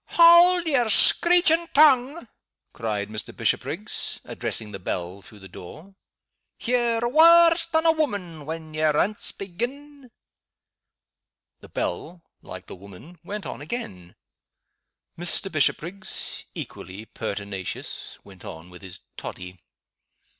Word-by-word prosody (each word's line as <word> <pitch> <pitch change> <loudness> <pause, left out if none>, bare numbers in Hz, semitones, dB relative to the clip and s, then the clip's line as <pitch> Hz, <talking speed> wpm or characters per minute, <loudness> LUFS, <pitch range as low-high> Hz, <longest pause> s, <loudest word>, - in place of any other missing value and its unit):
"Haud 345 +1 +7
yer 265 -8 +1
screechin' 340 - +5
tongue!" 275 -1 +4 0.5
cried 105 -3 -3
Mr. 110 0 -6
Bishopriggs, - - -2
addressing 105 -2 -5
the 95 - -8
bell 90 +1 -5
through 105 - -15
the 95 -1 -13
door. 155 - -13 0.7
"Ye're 240 -1 0
waur 335 +5 +7 0.2
than 320 0 +1
a 325 - +7
woman 195 - -4
when 160 -1 -7
ye 155 - -4
aince 155 +7 0
begin!" 255 +8 -7 1.5
The - - -15
bell 175 -1 -5 0.2
like - - -10
the - - -10
woman 100 - -14
went 205 +3 -7
on 125 - -7
again. 100 - -7 1.0
Mr. 175 +2 0
Bishopriggs, 170 +5 -2
equally 95 +5 -8
pertinacious, 100 -4 -6
went 95 -3 -15
on 80 +2 -10
with 90 - -13
his 95 -3 -10 0.2
toddy. 90 0 -9
175 Hz, 115 wpm, -24 LUFS, -, 1.5 s, Haud